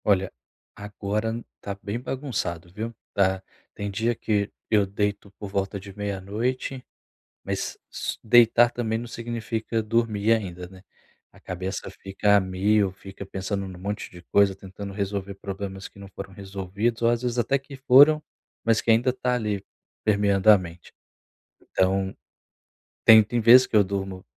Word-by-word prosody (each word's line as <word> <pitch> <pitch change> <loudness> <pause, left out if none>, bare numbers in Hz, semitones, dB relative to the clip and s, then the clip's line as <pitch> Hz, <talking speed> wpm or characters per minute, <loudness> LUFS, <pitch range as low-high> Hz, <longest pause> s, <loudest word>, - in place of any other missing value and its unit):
Olha, 95 -2 +2 0.4
agora 105 +3 -3 0.2
tá 100 -1 -5
bem 105 +4 -3
bagunçado, 120 - -4
viu? 110 +3 -4 0.2
Tá. 95 -1 +1 0.3
Tem 100 0 -4
dia 115 +4 0
que 105 -2 -1 0.2
eu 105 -2 +4
deito 100 +1 -2
por 105 - -6
volta 100 +1 -2
de 100 0 -11
meia 100 -2 -3
noite, 125 +6 -3 0.6
mas - - -3
só - - -4
deitar 120 +1 +6
também 115 -2 -2
não 120 - -5
significa 115 -1 -3
dormir 110 -1 +1
ainda, 90 -6 -1
né. 95 -1 -14 0.5
A - - -19
cabeça 95 +1 -5
fica 100 +1 +1
a - - +5
mil, 95 +2 +1
fica 95 +1 -10
pensando 95 +1 -3
num 95 -1 -9
monte 100 +2 -4
de 90 - -12
coisa 100 -1 +4
tentando 100 +1 -9
resolver 100 -1 -3
problemas 95 0 -6
que - - -18
não 100 - -9
foram 95 0 -9
resolvidos 100 +4 -3
ou, 115 - +4
às 120 0 +1
vezes, 125 -1 -1
até 135 +3 +2
que 135 +1 -12
foram, 140 +4 +6 0.4
mas 115 -1 +3
que 115 - +2
ainda 115 +3 +4
tá 125 0 -1
ali, 105 -4 -2 0.4
permeando 100 -1 +3
a 105 - +10
mente. 85 -1 -10 0.7
Então, 95 0 0 0.9
tem 110 0 +9
tem 120 +4 -2
vezes 125 +3 +8
que - - -4
eu 105 - +7
durmo, 95 -1 -4
100 Hz, 160 wpm, -25 LUFS, 95-115 Hz, 0.9 s, a